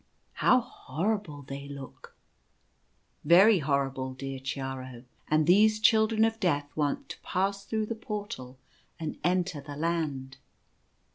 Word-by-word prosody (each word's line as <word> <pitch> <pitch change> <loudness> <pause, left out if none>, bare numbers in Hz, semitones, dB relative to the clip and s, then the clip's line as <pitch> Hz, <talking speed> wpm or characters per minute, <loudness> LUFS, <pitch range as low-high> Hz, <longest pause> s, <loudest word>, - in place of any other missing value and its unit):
" - - -42
How 255 0 +6
horrible 165 - -3
they 140 +1 -7
look! 140 -2 -10 0.3
" - - -43
" - - -43
Very 190 +6 +7
horrible, 135 -3 -1
dear 135 0 -5
Chiaro; 130 -2 -5 0.2
and 155 0 +3
these 215 +5 +5
Children 220 0 +4
of 225 0 -1
Death 145 -6 0
want 155 - -1
to - - -8
pass 195 +2 -1
through 220 -1 -1
the 230 - -3
Portal 205 - -6 0.4
and 160 -2 -5
enter 180 -3 0
the 145 +1 -8
Land." 145 -4 -2
155 Hz, 140 wpm, -29 LUFS, 135-205 Hz, 0.4 s, Very